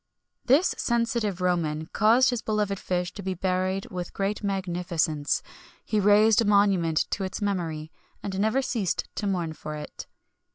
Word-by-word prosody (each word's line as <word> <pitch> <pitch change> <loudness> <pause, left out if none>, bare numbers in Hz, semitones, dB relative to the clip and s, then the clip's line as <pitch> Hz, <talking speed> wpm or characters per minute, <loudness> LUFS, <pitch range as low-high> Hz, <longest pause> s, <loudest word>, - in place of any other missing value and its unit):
This 285 +8 +4
sensitive 230 -5 0
Roman 160 -4 0
caused 230 +9 +4
this 245 -2 -2
beloved 210 -3 -1
fish 180 -1 -2
to 205 - -7
be 190 -1 -3
buried 185 +1 -1
with 180 -1 -6
great 200 +2 -2
magnificence: 175 -6 -1 0.4
he 215 - 0
raised 210 +2 +5
a - - +1
monument 195 -6 +3
to 200 - -1
its 190 - -4
memory, 165 -7 -2 0.3
and 195 -1 -3
never 220 +6 +2
ceased 220 -8 -1
to 205 - -3
mourn 175 -5 -1
for 155 -1 -7
it. 150 - -8
195 Hz, 155 wpm, -26 LUFS, 175-210 Hz, 0.4 s, raised